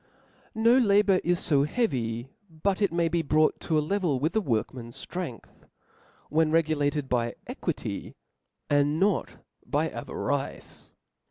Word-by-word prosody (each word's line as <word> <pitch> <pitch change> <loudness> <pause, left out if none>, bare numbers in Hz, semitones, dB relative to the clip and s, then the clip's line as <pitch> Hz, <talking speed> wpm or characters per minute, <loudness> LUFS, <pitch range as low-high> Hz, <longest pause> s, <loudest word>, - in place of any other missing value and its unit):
No 230 +3 +5
labour 200 -4 +4
is 175 0 +1
fo 140 -5 +4
heavy, 130 - -1 0.2
but 185 +5 -1
it 200 -4 +3
may 170 0 +1
be 170 0 +1
brought 155 0 +2
to 160 - 0
a - - +3
level 175 -6 0
with 155 +5 0
the 220 - +2
workman's 120 - -3
ftrength, 175 -11 -7 0.6
when 160 +1 +2
re 165 +1 +4
gulated 145 -2 -1
by 120 -2 0
equity, - - -4 0.5
and 145 +2 +2
not 195 -5 +1 0.3
by - - 0
avarice. - - -4
155 Hz, 140 wpm, -27 LUFS, 140-185 Hz, 0.6 s, No